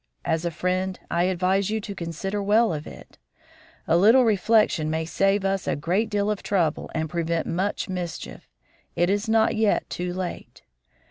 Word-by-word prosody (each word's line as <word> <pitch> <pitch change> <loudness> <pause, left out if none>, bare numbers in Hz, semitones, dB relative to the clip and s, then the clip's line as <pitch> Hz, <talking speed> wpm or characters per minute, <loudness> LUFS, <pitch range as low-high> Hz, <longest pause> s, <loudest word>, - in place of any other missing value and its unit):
As 160 +1 0
a - - +1
friend, 185 +2 -2
I 170 +1 +2
advise 185 +2 +1
you 220 +1 -1
to 205 - -6
consider 190 +3 -4
well 215 +1 +3
of 150 -1 -5
it; - - -13 0.7
a 165 - +3
little 225 +8 +6
reflection 210 -6 +2
may 160 +1 -1
save 195 +3 +1
us 195 -1 -1
a - - +1
great 185 +9 0
deal 205 0 0
of 210 - -3
trouble 170 -7 0
and 160 0 -1
prevent 170 0 -1
much 190 +4 -2
mischief; 180 -3 -6 0.5
it 175 +2 +2
is 205 +3 -1
not 225 0 +3
yet 220 -1 +1
too 180 0 -3
late. 180 -1 -6
190 Hz, 175 wpm, -24 LUFS, 170-205 Hz, 0.7 s, little